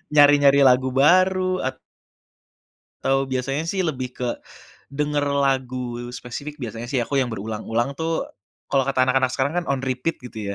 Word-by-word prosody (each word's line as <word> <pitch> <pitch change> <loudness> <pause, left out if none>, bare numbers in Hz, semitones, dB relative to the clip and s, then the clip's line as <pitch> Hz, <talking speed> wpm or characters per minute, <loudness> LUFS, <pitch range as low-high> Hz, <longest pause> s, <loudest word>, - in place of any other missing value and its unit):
Nyari-nyari 145 -1 +6
lagu 125 +1 +3
baru 185 +6 +3
at 130 0 -3 1.3
Atau 135 0 +1
biasanya 135 +4 -2
sih 190 0 0
lebih 130 -5 -2
ke 125 -1 -2 0.6
denger 145 +1 -1 0.2
lagu 130 -2 -1 0.2
spesifik 145 +5 -7
biasanya 115 0 -5
sih 130 -2 0
aku 140 +4 -1
yang 130 - +1
berulang-ulang 110 +4 -2
tuh 165 0 -1 0.5
kalau 135 -1 +3
kata 135 -2 +2
anak-anak 130 0 +2
sekarang 135 +2 0
kan - - -11
on 135 -1 0
repeat 130 +5 -2
gitu 110 -5 -6
135 Hz, 150 wpm, -23 LUFS, 125-145 Hz, 1.3 s, Nyari-nyari